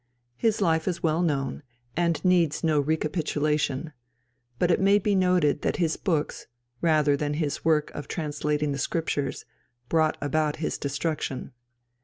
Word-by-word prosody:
His 220 - +1
life 160 -4 +2
is 180 -2 -2
well 160 +1 +2
known, 140 -6 -1 0.3
and 170 +1 0
needs 175 -4 +3
no 155 -2 +3
recapitulation; 150 -1 -1 0.6
but 175 +5 +2
it - - +3
may 200 +1 +5
be 205 0 +1
noted 180 -6 +3
that - - 0
his 165 -3 +1
books, 160 -6 -2 0.3
rather 155 -3 +3
than 145 +1 -2
his 150 -2 -2
work 155 -2 +2
of 145 - -7
translating 150 -2 -1
the 140 - -3
Scriptures, 145 -3 -2 0.4
brought 160 -1 +2
about 150 +1 0
his 160 - -3
destruction. 140 -1 -3
155 Hz, 145 wpm, -26 LUFS, 145-170 Hz, 0.6 s, may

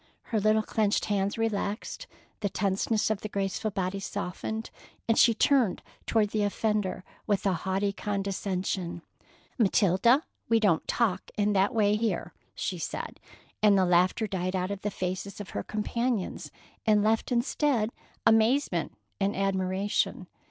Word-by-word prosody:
Her 220 - +3
little 215 +1 +3
clenched 210 -1 +1
hands 200 0 0
relaxed, 225 - -2 0.3
the 200 - -1
tenseness 205 +3 0
of 215 - -2
the 215 - -5
graceful 200 +2 -1
body 195 -1 -2
softened, 205 +3 -4 0.4
and 225 - +3
she 230 0 +5
turned 250 -5 +3 0.2
toward 215 -2 +2
the 215 - 0
offender 205 -2 0 0.2
with 205 -2 +1
a 195 - +3
haughty 190 +3 -1
condescension: 190 -4 -2 0.6
"Matilda, 215 - +4 0.3
we 230 0 +5
don't 200 -7 +2
talk 230 -6 0
in 210 0 +2
that 195 +3 +3
way 210 -1 +3
here," 225 0 -2 0.2
she - - -3
said, - - -5 0.4
and 210 -2 +6
the 190 - +4
laughter 180 +5 +3
died 185 -2 -2
out 185 +1 -1
of 200 -1 -4
the 210 - -1
faces 185 +1 -4
of 205 - -7
her 100 - -2
companions 220 - -2 0.3
and 210 -1 +4
left 220 +3 +1
instead 240 -1 +1 0.3
amazement 225 +6 +3 0.2
and 200 +1 +1
admiration. 190 0 0
205 Hz, 145 wpm, -28 LUFS, 190-220 Hz, 0.6 s, and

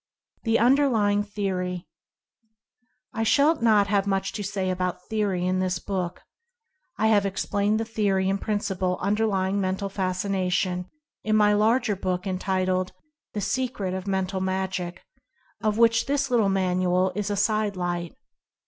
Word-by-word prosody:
THE 225 0 +3
UNDERLYING 235 -5 +3
THEORY. 185 -4 -3 1.3
I 225 - -2
shall 280 +7 +3
not 215 -3 +5
have 200 -1 +1
much 195 -1 0
to 210 - -4
say 190 -1 -2
about 180 0 -3
theory 200 -5 0
in 185 0 +1
this 185 -1 0
book. 180 -2 -4 0.7
I 220 - +1
have 205 -2 +4
explained 200 +2 0
the 225 - -1
theory 200 -4 0
and 195 +1 0
principle 190 -4 -1
un 200 +2 +1
io 225 - +3
Mental - - 0
Fascination 190 0 0
derlying - - 0
Mental 190 +1 -2
Fascination, 185 -1 -1 0.4
in 215 0 +1
my 210 -1 +5
larger 220 +1 +2
book 185 -1 -2
en 185 -1 -2
titled 185 -1 0 0.4
"The 205 - -1
Secret 225 -4 -2
of 190 +1 -5
Mental 190 -1 -1
Magic," 190 -2 -3 0.6
of 215 -1 0
which 230 +1 +4
this 275 -1 0
little 225 -5 +3
manual 185 -1 +1
is 210 +1 -2
a 205 - 0
"Side 210 0 +1
Light." 175 -1 -3
195 Hz, 155 wpm, -25 LUFS, 185-215 Hz, 1.3 s, not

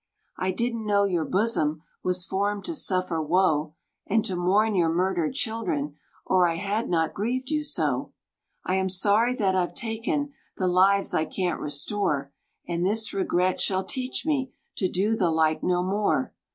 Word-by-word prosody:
"I 185 - 0
didn't 230 +2 -2
know 200 -1 +3
your 175 -5 0
bosom 165 -7 0 0.2
Was 180 0 0
formed 200 +1 -1
to 335 - -2
suffer 185 - 0
woe, 155 -2 +1 0.3
And 220 +1 +2
to 185 - -2
mourn 200 +5 +2
your 175 -4 +3
murdered 175 +2 0
children, 195 - -1 0.3
Or 185 -1 +4
I 165 - -1
had 205 +7 -2
not 165 -2 +1
grieved 255 +6 -2
you 305 -1 +1
so. 300 - -1 0.5
"I 185 - +1
am 190 0 0
sorry 210 +6 +3
that 195 -5 +1
I've 180 -2 0
taken 255 +4 -2 0.2
The 185 - 0
lives 195 +2 +3
I 155 - +2
can't 180 +2 -2
restore; 145 -2 -1 0.3
And 170 0 -1
this 220 +3 +1
regret 185 -1 +1
shall 190 -1 +1
teach 255 +6 -3
me 270 -5 0 0.3
To 185 - +1
do 205 +6 +1
the 185 -6 +1
like 160 -1 +2
no 180 0 +1
more. 205 +7 0
190 Hz, 165 wpm, -26 LUFS, 175-220 Hz, 0.5 s, Or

